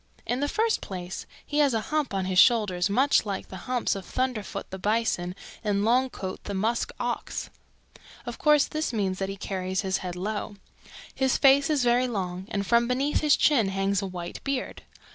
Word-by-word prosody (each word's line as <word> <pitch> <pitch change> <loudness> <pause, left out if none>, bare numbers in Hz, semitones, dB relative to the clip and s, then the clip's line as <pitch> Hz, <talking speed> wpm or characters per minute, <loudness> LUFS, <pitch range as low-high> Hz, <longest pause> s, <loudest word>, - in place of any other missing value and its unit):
"In 245 - -1
the 290 - 0
first 445 +8 +1
place 180 -1 -6 0.2
he 295 - -1
has 280 -5 +4
a - - +2
hump 305 -2 +1
on 195 -2 -1
his 185 -1 +2
shoulders 205 -6 +4
much 265 +8 +3
like 200 -3 -4
the 190 +4 -9
humps 250 -2 +1
of 195 - -5
Thunderfoot 250 -2 -3
the 190 - -6
Bison 205 -4 0 0.3
and 205 -1 +1
Longcoat 240 -5 0
the 200 - -4
Musk 220 +5 0
Ox. - - -3 0.7
Of 240 -1 -6
course 300 -2 +5
this 310 -2 -2
means 195 -5 -1
that 195 0 -2
he 195 - -5
carries 190 -1 -2
his 190 -2 0
head 180 -1 -5
low. 205 +3 -4 0.6
His 265 -1 +1
face 275 +1 +5
is 295 -4 +2
very 245 +1 +3
long 190 -4 -4
and 200 -1 -2
from 235 +3 +3
beneath 270 +4 +1
his 300 -2 +4
chin 250 -9 +4
hangs 195 0 0
a 195 - -3
white 175 -2 -7
beard. 275 -2 -3
215 Hz, 190 wpm, -27 LUFS, 190-255 Hz, 0.7 s, course